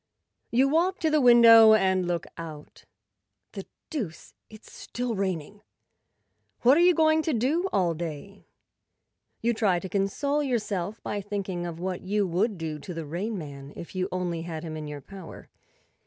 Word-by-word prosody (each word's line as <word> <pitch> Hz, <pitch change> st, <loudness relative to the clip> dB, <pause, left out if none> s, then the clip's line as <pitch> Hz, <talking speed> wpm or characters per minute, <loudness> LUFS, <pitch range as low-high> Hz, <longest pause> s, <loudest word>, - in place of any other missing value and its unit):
You 255 Hz, +3 st, +3 dB
walk 345 Hz, +6 st, +1 dB
to 320 Hz, -2 st, +1 dB
the 305 Hz, -1 st, +3 dB
window 230 Hz, -3 st, +8 dB
and 190 Hz, -3 st, +1 dB
look 175 Hz, -1 st, -2 dB
out. 155 Hz, -3 st, -10 dB, 0.7 s
The -, -, -8 dB, 0.2 s
deuce! 220 Hz, -, -5 dB, 0.2 s
It's 215 Hz, 0 st, -15 dB
still 245 Hz, -1 st, -4 dB
raining. 195 Hz, -1 st, -3 dB, 1.0 s
What 250 Hz, +3 st, +6 dB
are 335 Hz, -, +4 dB
you 355 Hz, 0 st, +5 dB
going 315 Hz, 0 st, +4 dB
to 315 Hz, -1 st, -1 dB
do 305 Hz, -, 0 dB
all 180 Hz, -3 st, +1 dB
day? 170 Hz, +4 st, -7 dB, 1.0 s
You 235 Hz, +1 st, +2 dB
try 210 Hz, -5 st, +1 dB
to 180 Hz, -, -5 dB
console 210 Hz, +10 st, -1 dB
yourself 215 Hz, -6 st, -2 dB
by 205 Hz, -, -3 dB
thinking 195 Hz, -3 st, -4 dB
of 165 Hz, -1 st, -7 dB
what 185 Hz, 0 st, -3 dB
you 205 Hz, +2 st, 0 dB
would 190 Hz, +4 st, 0 dB
do 160 Hz, -2 st, -5 dB
to 175 Hz, +4 st, -8 dB
the 165 Hz, -1 st, -5 dB
Rain 195 Hz, +8 st, -4 dB
Man 140 Hz, -3 st, -9 dB
if 170 Hz, -, -9 dB
you 185 Hz, -1 st, -2 dB
only 175 Hz, -2 st, -2 dB
had 165 Hz, -2 st, -6 dB
him 160 Hz, -2 st, -6 dB
in 155 Hz, -1 st, -6 dB
your 145 Hz, -1 st, -7 dB
power. 190 Hz, +3 st, -12 dB
195 Hz, 170 wpm, -26 LUFS, 170-235 Hz, 1.0 s, window